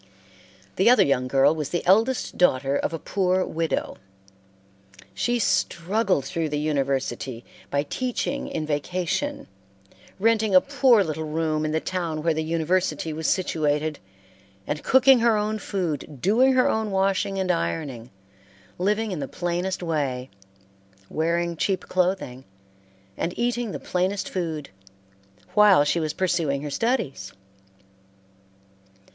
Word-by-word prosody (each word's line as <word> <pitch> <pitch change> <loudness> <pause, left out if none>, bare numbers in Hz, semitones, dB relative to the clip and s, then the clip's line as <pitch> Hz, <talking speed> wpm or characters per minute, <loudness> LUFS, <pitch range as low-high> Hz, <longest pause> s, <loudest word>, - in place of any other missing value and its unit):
The 190 - +5
other 250 - +6
young 130 -2 +1
girl 135 +3 +4
was 150 -3 -4
the 175 - -2
eldest 225 +8 +2
daughter 140 -5 +2
of - - -1
a 165 - -3
poor 185 +2 0
widow. 165 0 -2 1.2
She 240 - 0
struggled 190 - 0
through 160 +2 -2
the 150 - -2
university 135 -4 -2 0.2
by 140 0 0
teaching 250 - -3
in 155 - -3
vacation; 180 - -2 0.7
renting 220 -1 +2
a - - +10
poor 260 -4 +3
little 160 -2 -4
room 155 0 -1
in 155 - -1
the 160 - +1
town 165 -4 -3
where 165 -1 +2
the 160 - -2
university 165 0 -1
was 160 +1 -3
situated, 155 -4 0 0.7
and 150 - -4
cooking 265 0 +6
her 230 -2 +3
own 215 +1 -1
food, 160 -8 -4
doing 240 - +4
her 255 0 +4
own 220 -1 0
washing 195 0 0
and 190 -1 +1
ironing, 120 - -3 0.7
living 210 +3 0
in 180 - -3
the 140 - -3
plainest 175 +3 -3
way, 140 -6 -2 0.8
wearing 170 +2 0
cheap 185 +3 0
clothing, 180 -9 -1 0.7
and 175 - -3
eating 240 -1 -1
the - - -5
plainest 185 +2 -1
food, 160 -5 -4 0.8
while 205 -7 +6
she 145 +4 +1
was 155 -2 -1
pursuing 165 -7 0
her 145 - -5
studies. 140 - -2
170 Hz, 130 wpm, -24 LUFS, 150-200 Hz, 1.2 s, a